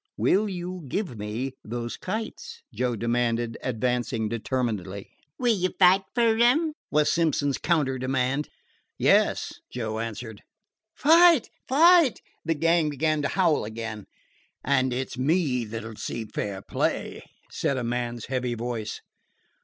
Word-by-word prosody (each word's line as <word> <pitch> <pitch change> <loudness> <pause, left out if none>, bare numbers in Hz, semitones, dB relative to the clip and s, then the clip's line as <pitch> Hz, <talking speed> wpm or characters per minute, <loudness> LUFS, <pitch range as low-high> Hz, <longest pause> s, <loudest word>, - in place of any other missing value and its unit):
"Will 210 +2 +2
you 180 -1 -5
give 175 - -3
me 110 +6 -4
those 120 +1 -4
kites?" 460 - -6
Joe 125 -1 -1
demanded, 115 0 0
advancing 120 -2 -1
determinedly. 110 -5 -3 0.3
"Will 245 -2 +2
you 185 -3 -1
fight 190 +1 +5
for 230 -2 +3
'em?" 300 +7 +4 0.2
was 150 0 +3
Simpson's 150 -4 +1
counter 145 -6 +1
demand. 130 +2 -1 0.5
"Yes," - - +2
Joe 110 -3 -3
answered. 115 -1 -6 0.5
"Fight! 330 -2 +5 0.2
fight!" 325 0 +5 0.2
the 165 - 0
gang 165 0 +2
began 155 +1 0
to 140 - 0
howl 170 -2 +2
again. 110 -1 -6 0.6
"And 130 -1 +2
it 130 +1 -3
's - - -8
me 135 -4 +1
that 110 +1 -6
'll 110 -1 -9
see 115 -1 -4
fair 100 -2 -4
play," - - -2 0.3
said 140 - -1
a 125 - -2
man's 120 -1 -3
heavy 125 -2 -2
voice. 115 -2 -4
130 Hz, 135 wpm, -26 LUFS, 115-180 Hz, 0.6 s, fight